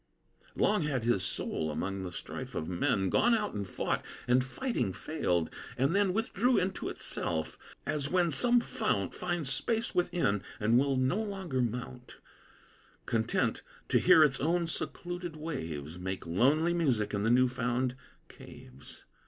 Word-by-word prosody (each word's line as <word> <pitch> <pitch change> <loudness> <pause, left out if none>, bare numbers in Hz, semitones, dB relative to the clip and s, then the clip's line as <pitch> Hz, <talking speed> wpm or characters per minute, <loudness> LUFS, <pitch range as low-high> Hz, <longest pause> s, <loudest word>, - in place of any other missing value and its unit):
Long 210 -2 +2
had 140 -6 -1
his 115 -5 +2
soul, 80 -3 -2
among 95 +5 -3
the 90 -1 -5
strife - - -7
of 80 - -2
men, 95 +2 +1
Gone 240 -1 +4
out 210 -2 -1
and 100 -2 -4
fought, - - -1 0.2
and 125 +1 +4
fighting, 130 - -2
failed; 90 - -1 0.3
and 135 +8 +2
then 200 -2 +3
Withdrew 225 +4 +1
into 190 +1 -1
itself: 80 -2 -3 0.3
as 145 -2 -1
when 175 -2 +2
some 240 - +4
fount 100 - -1
Finds 175 -6 -2
space 230 0 0
within, 175 - +1 0.2
and 115 +3 +4
will 140 0 +2
no 130 +11 +1
longer 190 -11 -2
mount, 125 +1 -4 0.9
Content 110 -1 0 0.3
to - - +4
hear 160 - +7
its 135 -3 +2
own 170 +3 +1
secluded 175 0 -5
waves 85 - -5
Make 95 +1 -4
lonely 140 - +3
music 130 -13 +1
in 100 - 0
the 110 - +1
new 125 +2 +5
found 125 +1 -1 0.3
caves. - - -12
130 Hz, 150 wpm, -31 LUFS, -, 0.9 s, hear